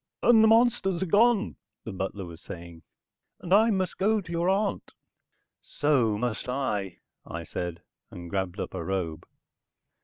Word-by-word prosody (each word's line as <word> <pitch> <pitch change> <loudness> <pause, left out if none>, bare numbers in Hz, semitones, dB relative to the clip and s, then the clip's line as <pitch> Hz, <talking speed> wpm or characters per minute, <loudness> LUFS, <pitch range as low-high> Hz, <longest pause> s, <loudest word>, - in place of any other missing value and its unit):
"And 225 -2 +6
the - - +6
monsters 225 -5 +3
are - - -1
gone," 210 +4 +3 0.3
the 110 - -6
butler 95 +1 -4
was 85 -1 -11
saying. 85 -3 -10 0.6
"And 180 - -2
I 220 +3 +6
must 190 -4 -1
go 215 +3 +3
to 175 -4 -9
your 170 +1 +1
aunt." 200 +1 -1 0.7
"So 130 -8 +1
must 120 +1 -3
I," 105 -8 -2 0.3
I 85 0 -6
said, 85 +1 -5 0.3
and 85 0 -9
grabbed 95 +1 -3
up - - -4
a - - -4
robe. 85 -3 -3
130 Hz, 155 wpm, -27 LUFS, -, 0.7 s, And